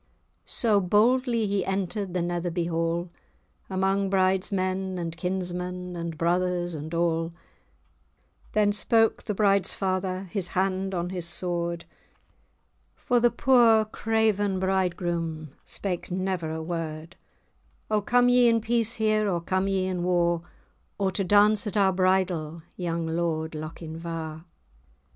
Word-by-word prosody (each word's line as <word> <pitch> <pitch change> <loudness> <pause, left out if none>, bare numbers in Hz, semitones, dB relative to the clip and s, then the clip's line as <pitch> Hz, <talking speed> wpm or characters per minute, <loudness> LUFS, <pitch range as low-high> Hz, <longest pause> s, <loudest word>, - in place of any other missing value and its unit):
So 215 -4 +2
boldly 230 +4 +2
he 200 -2 0
entered 195 0 -3
the 180 - +1
Netherby 175 0 -2
Hall, 165 +1 -1 0.6
Among 195 +1 +1
bride's 190 0 +2
men, 185 -1 -1
and 165 -2 -4
kinsmen, 180 0 -4
and 170 -2 -5
brothers, 175 +1 0
and 155 0 -6
all, 165 0 0 1.2
Then 210 -1 +3
spoke 225 +2 +2
the 210 - -4
bride's 200 -2 +2
father, 185 -1 -1
his 195 -4 -1
hand 190 0 0
on 175 +1 -2
his 175 -3 -4
sword 170 -1 -3 1.1
(For 245 -1 +1
the 240 0 +4
poor 235 -4 +4
craven 215 -3 0
bridegroom 175 -5 -1
said 185 -4 -4
never 185 -2 -2
a 160 0 -4
word), 165 0 -5 0.8
"O 210 -1 +2
come 245 +4 +3
ye 245 0 +5
in 230 -1 +4
peace 230 0 0
here, 215 -1 +1
or 175 -2 0
come 185 +3 -1
ye 190 -1 0
in 185 -1 -2
war, 175 -1 +1 0.6
Or 195 -1 0
to 190 +2 -1
dance 210 +3 +4
at 210 - -2
our 195 -2 +4
bridal, 180 -4 0
young 170 -2 -2
Lord 160 -1 -1
Lochinvar?" 160 0 -6
185 Hz, 130 wpm, -26 LUFS, 170-200 Hz, 1.2 s, ye